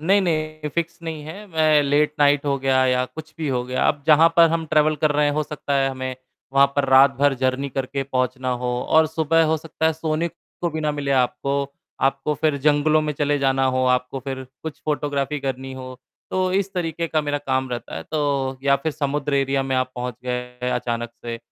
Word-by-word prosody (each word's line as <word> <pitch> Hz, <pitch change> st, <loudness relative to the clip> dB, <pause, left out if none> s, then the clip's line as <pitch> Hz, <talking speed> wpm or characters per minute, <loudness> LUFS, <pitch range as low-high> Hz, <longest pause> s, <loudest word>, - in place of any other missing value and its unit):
नहीं, 195 Hz, +6 st, +3 dB
नहीं 155 Hz, -3 st, -2 dB
फ़िक्स 170 Hz, 0 st, -2 dB
नहीं 160 Hz, -2 st, -5 dB
है। 190 Hz, +7 st, -9 dB
मैं 155 Hz, -4 st, +3 dB
लेट 145 Hz, +1 st, +2 dB
नाइट 145 Hz, 0 st, +4 dB
हो 140 Hz, -1 st, 0 dB
गया 130 Hz, -1 st, +2 dB
या 125 Hz, 0 st, +2 dB
कुछ 155 Hz, +4 st, -10 dB
भी 155 Hz, -2 st, -2 dB
हो 125 Hz, -2 st, 0 dB
गया। 125 Hz, 0 st, 0 dB
अब 145 Hz, -1 st, 0 dB
जहाँ 160 Hz, +2 st, +7 dB
पर 170 Hz, -1 st, +7 dB
हम 165 Hz, 0 st, 0 dB
ट्रैवल 155 Hz, 0 st, +3 dB
कर 150 Hz, +1 st, +1 dB
रहे 150 Hz, 0 st, +2 dB
हैं 145 Hz, -, +1 dB
हो 155 Hz, +1 st, 0 dB
सकता 145 Hz, -1 st, -4 dB
है 135 Hz, -1 st, +2 dB
हमें 130 Hz, -1 st, -4 dB, 0.4 s
वहाँ 140 Hz, 0 st, +6 dB
पर 140 Hz, -, +3 dB
रात 135 Hz, +1 st, +7 dB
भर 145 Hz, 0 st, +3 dB
जर्नी 130 Hz, +2 st, -1 dB
करके 135 Hz, +1 st, -3 dB
पहुँचना 130 Hz, -1 st, -1 dB
हो -, -, -1 dB, 0.2 s
और 160 Hz, 0 st, +5 dB
सुबह 160 Hz, +1 st, +2 dB
हो 160 Hz, +1 st, +2 dB
सकता 160 Hz, 0 st, -2 dB
है 160 Hz, -, +3 dB
सोने 160 Hz, +1 st, -1 dB
को 170 Hz, +1 st, -7 dB
भी 160 Hz, 0 st, -4 dB
ना 150 Hz, -1 st, 0 dB
मिले 145 Hz, -1 st, -3 dB
आपको। 140 Hz, +2 st, 0 dB, 0.3 s
आपको 135 Hz, +2 st, +1 dB
फ़िर 150 Hz, 0 st, +1 dB
जंगलों 150 Hz, +2 st, +3 dB
में 150 Hz, 0 st, -1 dB
चले 145 Hz, 0 st, 0 dB
जाना 135 Hz, -1 st, +2 dB
हो, 130 Hz, 0 st, +1 dB
आपको 125 Hz, +1 st, 0 dB
फ़िर 130 Hz, 0 st, -5 dB, 0.2 s
कुछ 160 Hz, -2 st, -7 dB
फ़ोटोग्राफी 145 Hz, -1 st, -1 dB
करनी 135 Hz, -1 st, -4 dB
हो। 130 Hz, -1 st, -8 dB, 0.3 s
तो 185 Hz, 0 st, 0 dB
इस 195 Hz, 0 st, 0 dB
तरीक़े 170 Hz, -1 st, -2 dB
का 155 Hz, -, +1 dB
मेरा 145 Hz, 0 st, -1 dB
काम 130 Hz, -2 st, -1 dB
रहता 120 Hz, -1 st, -5 dB
है, 80 Hz, -, -5 dB
तो 140 Hz, -, -1 dB
या 140 Hz, 0 st, +4 dB
फ़िर 155 Hz, +3 st, -3 dB
समुद्र 145 Hz, -1 st, -1 dB
एरिया 135 Hz, 0 st, +1 dB
में 135 Hz, 0 st, -2 dB
आप 130 Hz, 0 st, 0 dB
पहुँच 125 Hz, 0 st, -4 dB
गए 125 Hz, 0 st, -3 dB
अचानक 120 Hz, -1 st, -2 dB
से 115 Hz, -1 st, -4 dB
145 Hz, 215 wpm, -22 LUFS, 130-155 Hz, 0.4 s, जहाँ